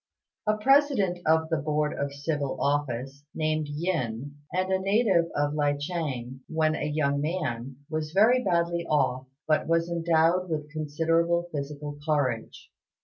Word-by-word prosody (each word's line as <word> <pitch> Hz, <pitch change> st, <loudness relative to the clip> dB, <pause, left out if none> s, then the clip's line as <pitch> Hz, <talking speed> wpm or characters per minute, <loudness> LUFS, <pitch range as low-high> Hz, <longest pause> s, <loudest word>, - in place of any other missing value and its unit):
A 215 Hz, 0 st, +3 dB
president 260 Hz, -7 st, +3 dB
of 160 Hz, 0 st, +3 dB
the 165 Hz, -, +1 dB
Board 150 Hz, +1 st, 0 dB
of 140 Hz, 0 st, -2 dB
Civil 140 Hz, -1 st, -3 dB
Office, 140 Hz, -1 st, -1 dB
named 155 Hz, -1 st, 0 dB
Yin, 145 Hz, -5 st, -2 dB, 0.2 s
and 185 Hz, +2 st, 0 dB
a 190 Hz, -, +2 dB
native 195 Hz, -3 st, +3 dB
of 145 Hz, 0 st, +1 dB
Li 145 Hz, -1 st, +2 dB
ch'êng, 145 Hz, -5 st, -4 dB
when 155 Hz, -1 st, +1 dB
a 150 Hz, -, -2 dB
young 140 Hz, -2 st, +1 dB
man, 135 Hz, -6 st, -3 dB
was 155 Hz, -1 st, -3 dB
very 230 Hz, +7 st, +4 dB
badly 170 Hz, -2 st, +1 dB
off, 130 Hz, -3 st, +1 dB, 0.2 s
but 155 Hz, -1 st, +2 dB
was 165 Hz, +1 st, +1 dB
endowed 170 Hz, +2 st, +2 dB
with 150 Hz, -1 st, -3 dB
considerable 165 Hz, +3 st, 0 dB
physical 145 Hz, 0 st, -5 dB
courage. 140 Hz, -7 st, -1 dB
155 Hz, 145 wpm, -27 LUFS, 145-170 Hz, 0.2 s, very